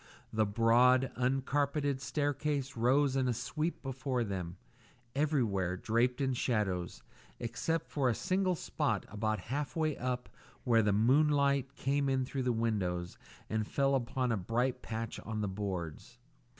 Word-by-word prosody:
The 110 -1 +2
broad 120 +4 +4
uncarpeted 135 +2 0
staircase 145 0 -1
rose 130 +4 +3
in 130 -1 +2
a 125 - +1
sweep 155 +7 -3
before 130 -2 -1
them, 95 -4 -4 0.6
everywhere 115 - +1
draped 120 +6 +1
in 135 -1 +1
shadows, 105 -8 -1 0.4
except 150 +8 -1
for 135 -4 +2
a 115 - +1
single 185 -1 +1
spot - - -1
about 110 +1 -1
half 145 0 -2
way 155 -3 +1
up 125 0 -3 0.4
where 115 -3 +4
the 105 -1 +2
moonlight 140 +4 +3
came 140 +1 0
in 130 -1 +1
through 135 +1 -3
the 125 -1 +1
window 100 -7 0 0.4
and 110 -1 -1
fell 135 -2 +2
on 130 -2 +1
a 115 - +1
bright 120 +7 -1
patch 115 0 -4
on 110 -1 -4
the 105 - 0
boards. 95 -5 -5
125 Hz, 145 wpm, -33 LUFS, 110-140 Hz, 0.6 s, broad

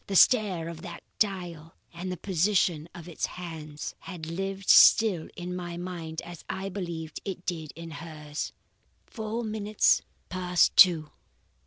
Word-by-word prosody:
The 195 - -3
stare 195 -7 +5
of 165 -1 -7
that 175 -2 -8 0.2
dial 175 -6 -2 0.2
and 180 +2 -5
the 180 - -4
position 175 -3 +1
of 175 -1 -9
its 170 - -2
hands 155 -4 -6
had 175 -4 -8
lived 195 +4 -4
still 200 -8 +7
in 180 0 -5
my 175 -1 -5
mind 170 -3 -5
as 170 -1 -10
I 195 +1 -3
believed 170 -5 -5
it 185 -2 -6
did 160 -4 -3
in 165 0 -8
hers. 150 -1 -6 0.5
"Four 225 +1 -4
minutes 215 -1 +2 0.3
past 180 -2 +2
two! 160 -5 +7
175 Hz, 145 wpm, -28 LUFS, 160-190 Hz, 0.5 s, still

